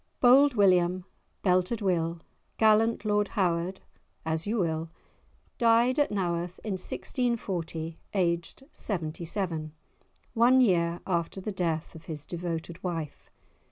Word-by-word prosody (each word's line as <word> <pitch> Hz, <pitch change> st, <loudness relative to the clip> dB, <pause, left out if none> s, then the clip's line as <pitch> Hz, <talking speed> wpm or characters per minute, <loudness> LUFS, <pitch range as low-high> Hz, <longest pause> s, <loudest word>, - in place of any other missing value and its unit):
Bold 265 Hz, +2 st, +6 dB
William, 185 Hz, -3 st, +3 dB, 0.4 s
Belted 185 Hz, +4 st, +2 dB
Will, 170 Hz, -4 st, 0 dB, 0.4 s
gallant 220 Hz, 0 st, +3 dB
Lord 210 Hz, -1 st, +2 dB
Howard, 180 Hz, 0 st, 0 dB, 0.4 s
as 160 Hz, +3 st, -1 dB
you 225 Hz, +3 st, 0 dB
will, 165 Hz, -3 st, -1 dB, 0.7 s
died 235 Hz, +3 st, +4 dB
at 290 Hz, -, +3 dB
Naworth 175 Hz, -3 st, -2 dB
in 215 Hz, -, -3 dB
1640 185 Hz, -, -3 dB, 0.2 s
aged 170 Hz, +5 st, -1 dB
seventy 170 Hz, -4 st, -4 dB
seven, 165 Hz, -4 st, -3 dB, 0.6 s
one 245 Hz, +3 st, +5 dB
year 175 Hz, -7 st, +2 dB
after 170 Hz, 0 st, -1 dB
the 200 Hz, +3 st, -4 dB
death 170 Hz, -4 st, -2 dB
of 160 Hz, -1 st, -12 dB
his 155 Hz, -5 st, -7 dB
devoted 170 Hz, 0 st, -5 dB
wife. 165 Hz, -5 st, -5 dB
180 Hz, 120 wpm, -28 LUFS, 170-210 Hz, 0.7 s, Bold